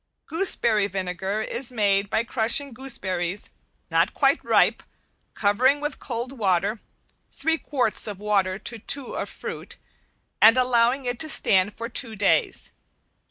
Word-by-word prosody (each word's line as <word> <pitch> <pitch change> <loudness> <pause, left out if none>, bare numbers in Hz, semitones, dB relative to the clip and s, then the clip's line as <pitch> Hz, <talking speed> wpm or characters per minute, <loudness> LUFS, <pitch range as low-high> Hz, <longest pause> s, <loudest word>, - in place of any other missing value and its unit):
Gooseberry 235 - +3
vinegar 190 +2 -3
is 245 +3 -4
made 200 -3 +1
by 225 - 0
crushing 235 +4 0
gooseberries 190 -7 -3 0.4
not - - +1
quite - - +2
ripe, - - +2 0.5
covering 250 +8 +2
with 295 -1 -4
cold 240 0 -5
water 205 -3 0 0.5
(three 325 +2 -1
quarts 250 -8 0
of 205 -2 -5
water 195 -3 0
to 230 +2 -6
two 275 +4 0
of - - -4
fruit) - - -8 0.6
and 225 +3 +7
allowing 250 +1 +2
it 245 -1 -3
to 310 - 0
stand 200 -6 +2
for 230 - -5
two 230 -1 -1
days. 200 -1 +1
225 Hz, 135 wpm, -24 LUFS, 200-255 Hz, 0.6 s, and